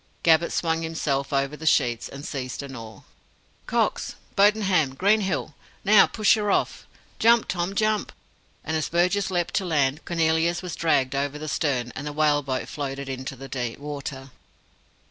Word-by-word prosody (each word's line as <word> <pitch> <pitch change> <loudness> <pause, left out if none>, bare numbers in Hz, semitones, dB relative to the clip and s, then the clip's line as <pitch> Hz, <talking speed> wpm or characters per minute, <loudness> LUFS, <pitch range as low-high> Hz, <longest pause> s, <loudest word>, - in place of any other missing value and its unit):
Gabbett 165 0 +4
swung 165 -1 0
himself 145 -4 -2
over 140 +1 0
the 160 +1 -6
sheets, 120 -7 +2
and 140 +2 -9
seized 130 -1 -5
an 135 -1 -8
oar. 115 -2 -10 0.6
"Cox, - - 0 0.2
Bodenham, 195 -9 +3
Greenhill! 190 -4 +1 0.3
Now, 210 0 +7
push 215 -2 +3
her 210 -2 0
off! - - 0 0.3
Jump, 235 0 +5
Tom, 180 +2 -2
jump!" 215 0 +1 0.5
and 160 - -2
as 155 - -1
Burgess 180 +4 +1
leapt 175 -2 -1
to 195 - -1
land, 150 -3 +1
Cornelius 165 +1 +1
was 180 -2 -5
dragged 135 -5 +1
over 140 +1 -1
the 155 +1 -6
stern, 135 -5 -1
and 145 +2 -5
the 150 - -4
whale 150 -1 +3
boat 130 -2 -3
floated 140 -1 -5
into 130 0 -5
deep 120 -3 -4
water. 140 -2 -7
155 Hz, 160 wpm, -25 LUFS, 135-175 Hz, 0.6 s, Now